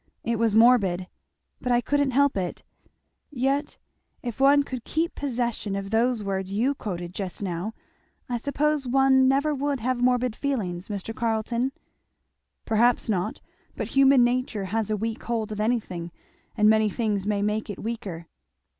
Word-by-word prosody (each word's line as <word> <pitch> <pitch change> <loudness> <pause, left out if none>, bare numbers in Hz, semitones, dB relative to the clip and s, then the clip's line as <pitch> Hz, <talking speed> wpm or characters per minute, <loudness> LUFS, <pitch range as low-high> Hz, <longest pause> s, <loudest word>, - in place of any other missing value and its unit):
"It 230 -1 -1
was 225 -2 +2
morbid. 215 -6 +4 0.6
But 250 - -1
I 240 - +4
couldn't 285 +3 +1
help 280 +2 +3
it. 185 -3 -3 0.7
Yet 275 +2 -1 0.5
if 240 -2 -5
one 285 +1 +5
could 255 -4 -6
keep 330 +2 -1
possession 240 -6 -2
of 195 0 -4
those 230 0 +2
words 195 -1 -3
you 235 +8 +1
quoted 180 -8 -5
just 190 0 -5
now, 185 +3 -3 0.5
I 245 - -1
suppose 285 +2 0
one 265 +1 +4
never 280 +3 +2
would 285 -1 -1
have 250 +1 -1
morbid 250 -2 +2
feelings, 200 -12 -3
Mr. 205 +2 -4
Carleton?" 235 +3 -1 0.9
"Perhaps 230 +2 +2
not; 185 -4 -1 0.3
but - - -4
human 275 -2 +5
nature 240 -4 0
has 225 -2 0
a 215 - 0
weak 225 +2 -3
hold 225 -3 -2
of 210 - -5
anything, 195 -7 -2 0.5
and 210 -1 +4
many 220 0 +4
things 205 -3 -1
may 205 -1 0
make 210 +1 -1
it 205 - -5
weaker." 210 -7 -5
230 Hz, 155 wpm, -25 LUFS, 205-260 Hz, 0.9 s, one